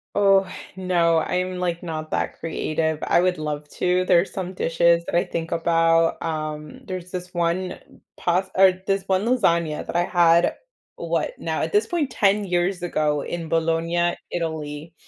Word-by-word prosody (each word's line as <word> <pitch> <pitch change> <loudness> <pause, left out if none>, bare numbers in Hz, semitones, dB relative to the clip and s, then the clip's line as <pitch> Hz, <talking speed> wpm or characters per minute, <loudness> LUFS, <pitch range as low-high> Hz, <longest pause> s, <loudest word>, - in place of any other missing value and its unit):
Oh, 195 -1 +4 0.3
no, 175 -3 +2
I'm, 180 +2 -2
like, 175 -1 -2
not 155 -2 -5
that - - -2
creative, 160 -1 -2
I - - +3
would 180 -1 +1
love 150 -1 -4
to, 180 0 +1
there's 180 0 +3
some 185 -1 -4
dishes 170 0 +2
that - - -3
I 175 - +4
think 165 0 -5
about, 165 0 +2
um, 155 -1 -4
there's 185 -1 -6
this 180 -1 -6
one 175 +1 -1 0.4
past 180 +2 0
or 190 0 +7 0.2
this 195 -1 +1
one 190 +2 +1
lasagna 170 -10 +1
that - - -7
I 175 - +2
had, 170 -1 +3 0.4
what - - -2
Now, - - -3
at - - -2
this 415 - +3
point, 320 -6 -1
10 205 -2 +2
years 180 0 0
ago, 150 -4 0
in 165 -2 -5
Bologna, 165 +1 +1 0.2
Italy, 160 -2 -4
175 Hz, 165 wpm, -23 LUFS, 165-185 Hz, 0.4 s, or